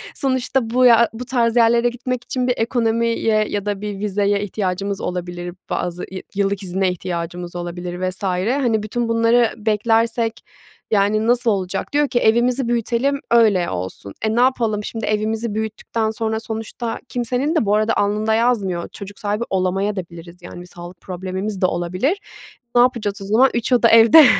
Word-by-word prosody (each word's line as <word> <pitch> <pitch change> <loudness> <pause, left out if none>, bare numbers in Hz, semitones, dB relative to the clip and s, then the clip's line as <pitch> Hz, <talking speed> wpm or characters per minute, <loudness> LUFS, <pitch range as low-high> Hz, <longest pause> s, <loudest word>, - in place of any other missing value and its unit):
sonuçta 260 -3 0
bu 250 +2 +3
ya 235 -1 +6
bu 240 +3 -6
tarz 235 -3 +1
yerlere 235 0 +4
gitmek 245 0 -4
için 250 0 -2
bir 250 - +3
ekonomiye 230 -2 +1
ya 205 0 -3
da 205 -1 -2
bir 205 -2 -5
vizeye 205 0 0
ihtiyacımız 195 0 -3
olabilir, 175 0 -5
bazı 180 0 -3
yı 190 - -6
yıllık 200 0 0
izine 190 +1 0
ihtiyacımız 175 0 -5
olabilir 175 +1 -4
vs. 185 - -8
Hani, 220 +5 0
bütün 235 +3 -2
bunları 230 0 +3
beklersek, 225 +1 +1 0.5
yani, 215 +1 +2
nasıl 240 -1 +3
olacak?" 195 +4 -3
Diyor 295 0 +3
ki 245 - 0
"Evimizi 240 +3 +2
büyütelim 240 +4 0
öyle 215 -7 +4
olsun." 95 +2 -6
Eee, 220 0 0
ne 240 - +3
yapalım, 230 -5 +1
şimdi 225 +1 -4
evimizi 215 +1 -1
büyüttükten 220 0 -2
sonra 220 0 -2
sonuçta 225 +1 -5
kimsenin 250 +6 -1
de 310 - +2
bu 205 - +2
arada 215 +1 +2
alnında 210 +2 +1
yazmıyor, 215 -7 0
çocuk 200 0 -10
sahibi 210 +2 -1
olamayabiliriz 185 -2 -3
de, - - -12
yani, 175 - -9
bir 180 - -11
sağlık 175 0 -11
problemimiz 190 +2 -5
de 185 - +4
olabilir. 185 - 0 0.6
Ne 240 - +7
yapacağız 215 -5 0
o - - -6
zaman? 230 +7 +4
3 235 +2 -1
oda 235 -1 +5
evde? 230 +7 +8
215 Hz, 165 wpm, -20 LUFS, 190-235 Hz, 0.6 s, evde